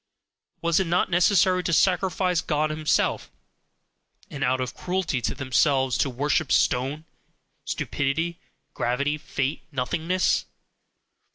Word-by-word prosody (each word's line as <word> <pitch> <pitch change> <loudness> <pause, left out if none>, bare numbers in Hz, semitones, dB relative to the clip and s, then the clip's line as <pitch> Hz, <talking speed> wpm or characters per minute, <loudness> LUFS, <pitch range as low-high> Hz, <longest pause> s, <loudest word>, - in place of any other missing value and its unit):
Was 170 +1 +3
it 190 - 0
not 175 +2 +1
necessary 185 +1 +4
to 170 - -2
sacrifice 180 0 +2
God 155 0 0
himself, 155 -1 0 1.0
and 140 0 -4
out 130 0 +1
of 130 -2 -3
cruelty 180 -8 -2
to 115 - -2
themselves 130 -1 +1
to 140 - +2
worship 140 +3 0
stone, 135 +5 +1 0.6
stupidity, 160 +5 -2 0.3
gravity, 140 +5 -1
fate, 140 -1 -3
nothingness? 160 +7 0
155 Hz, 110 wpm, -25 LUFS, 135-175 Hz, 1.0 s, necessary